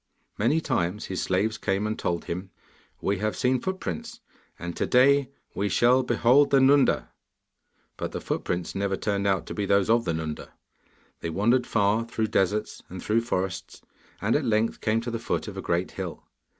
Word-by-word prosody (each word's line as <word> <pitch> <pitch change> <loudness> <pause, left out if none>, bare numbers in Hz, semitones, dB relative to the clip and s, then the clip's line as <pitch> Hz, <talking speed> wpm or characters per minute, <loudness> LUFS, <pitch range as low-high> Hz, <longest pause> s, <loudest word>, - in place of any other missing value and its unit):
Many 120 +10 +3
times 105 - -1
his 95 - -3
slaves 105 +4 0
came 95 +2 0
and 110 +1 -2
told 85 -1 -2
him, 90 +3 -5 0.5
'We 100 -1 0
have 110 +1 -1
seen 125 0 +1
footprints, 230 +5 -4 0.4
and 85 0 -6
to - - -1
day 135 +1 +4 0.2
we 100 +1 -1
shall 120 +7 +4
behold 125 +3 +4
the 135 - +5
Nunda.' 135 +1 +4 0.9
But - - -4
the - - -4
footprints 90 -1 -3
never 100 0 -1
turned 100 -1 -1
out 95 -2 +1
to - - -6
be 100 -1 -2
those 100 +2 +3
of 115 0 +3
the 85 - 0
Nunda. 80 -1 -5 0.7
They 85 - -4
wandered 115 +9 +2
far 105 +1 +2
through 110 -1 -2
deserts 100 +3 0
and 90 - -7
through 110 +5 +1
forests, 95 -5 -3 0.4
and 105 +3 +1
at 150 - +1
length 110 -2 0
came 110 0 +1
to 120 +1 -4
the 115 - -3
foot 115 - -2
of 105 - -7
a 95 - -4
great 85 +1 -1
hill. - - -6
105 Hz, 185 wpm, -26 LUFS, 95-120 Hz, 0.9 s, the